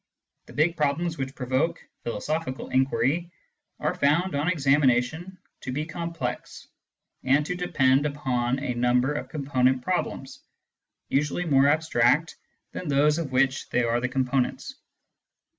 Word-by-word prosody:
The - - -13
big 165 +3 +2
problems 155 +3 0
which 135 0 -4
provoke 130 +6 -1 0.2
philosophical 130 +5 -3
inquiry 135 +5 +1 0.5
are - - 0
found, 165 +7 +1
on 145 +2 -1
examination, 145 +2 +1 0.2
to 130 - -6
be 150 +4 -2
complex, 170 0 -5 0.6
and 140 +3 +3
to 180 - -2
depend 145 -6 +2
upon 130 -4 -1
a 135 -2 -3
number 125 +3 +2
of 150 - -5
com 145 -3 -5
ponent 130 -2 +2
problems, 175 -6 -3 0.7
usually 150 +5 0
more 140 -3 +4
abstract 150 -1 +2 0.4
than 180 - -6
those 150 +2 +3
of 155 -5 -4
which 130 +1 +1
they 125 - +1
are 115 0 +1
the 125 - -1
components. 130 -1 -1
140 Hz, 135 wpm, -26 LUFS, 130-160 Hz, 0.7 s, more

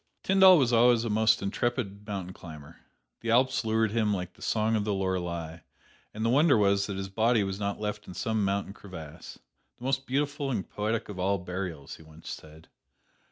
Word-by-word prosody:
Tyndall 190 -1 +7
was 125 -5 +2
always 120 0 +5
a 115 - -1
most 110 0 +3
intrepid 105 -1 -2
mountain 95 -3 -5
climber. 80 -6 -12 0.4
The 115 - -5
Alps 130 +3 +3
lured 110 -1 +1
him 110 -2 +1
like 90 -2 -3
the - - -22
song 110 0 +1
of 105 - +1
the 105 -1 -1
Lorelei, 90 -4 -3 0.5
and 110 +1 -4
the - - +2
wonder 145 0 +5
was 100 -1 +2
that 100 -2 -4
his 95 0 -4
body 110 +3 +2
was 95 0 -4
not 100 -1 -2
left 105 0 -4
in 90 - -9
some 110 -2 -1
mountain 100 0 -1
crevasse, 80 -6 -10 0.4
"the - - -14
most 135 +1 -1
beautiful 145 +1 -1
and 110 -7 -2
poetic 110 +2 -2
of 100 -3 -8
all 100 +2 +1
burials," 90 -5 -6
he - - -16
once 80 0 -13
said. 80 +1 -11
105 Hz, 195 wpm, -28 LUFS, 95-115 Hz, 0.5 s, Tyndall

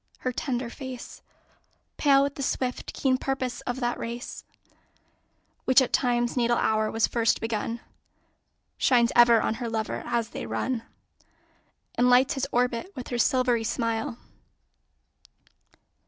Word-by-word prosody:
Her 255 - -1
tender 250 -1 -2
face, 260 -3 -8 0.8
Pale 275 -2 +5
with 280 -1 -1
the 280 - -7
swift, 255 -1 -2
keen 260 -2 +1
purpose 265 -2 -2
of 245 +1 -2
that 240 0 -1
race 235 +2 -6 1.2
Which 260 +1 +6
at 260 - 0
Time's 240 -2 +1
natal 240 -1 +2
hour 215 0 +1
was 225 0 +2
first 230 -1 +1
begun, 230 +1 -3 1.0
Shines 240 -2 +4
ever 240 -1 +7
on - - +1
her 235 - -2
lover 220 -1 -2
as 235 -1 -1
they - - -6
run 250 -3 -2 1.1
And 245 +1 +3
lights 255 +4 +5
his 270 -2 -2
orbit 245 +7 0
with 255 -3 -7
her 245 - -2
silvery 250 -3 +2
smile. 230 0 -2
245 Hz, 135 wpm, -26 LUFS, 235-260 Hz, 1.2 s, ever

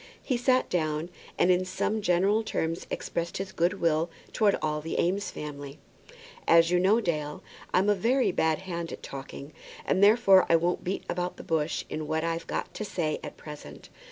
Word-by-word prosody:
He 255 - 0
sat 255 +1 +2
down, 155 -1 -1 0.3
and 185 - +4
in 180 0 +3
some 205 +4 -1
general 195 +3 +2
terms 165 -6 -3
expressed 170 0 -3
his 195 0 -4
good 175 +3 +1
will 165 0 +1 0.2
towards 210 -3 +3
all 150 -1 -1
the 160 - -3
Eames 195 +4 0
family. 145 -1 -7 0.7
"As 165 0 +6
you 180 - +4
know, 195 +5 +4
Dale, 150 -7 -3 0.3
I'm 185 +3 +3
a 210 - +5
very 240 +7 +2
bad 160 +2 0
hand 170 -2 -4
at - - -8
talking, 140 +2 -8 0.3
and 190 - +2
therefore 200 -3 +6
I 170 - +6
won't 170 +2 +1
beat 185 +2 -3
about 180 0 -3
the - - -9
bush 155 -1 -1
in 155 -1 -5
what 160 +1 -1
I've 165 0 -2
got - - -3
to - - -4
say 165 -7 -2
at 150 - -8
present. 145 - -10
170 Hz, 185 wpm, -28 LUFS, 155-195 Hz, 0.7 s, As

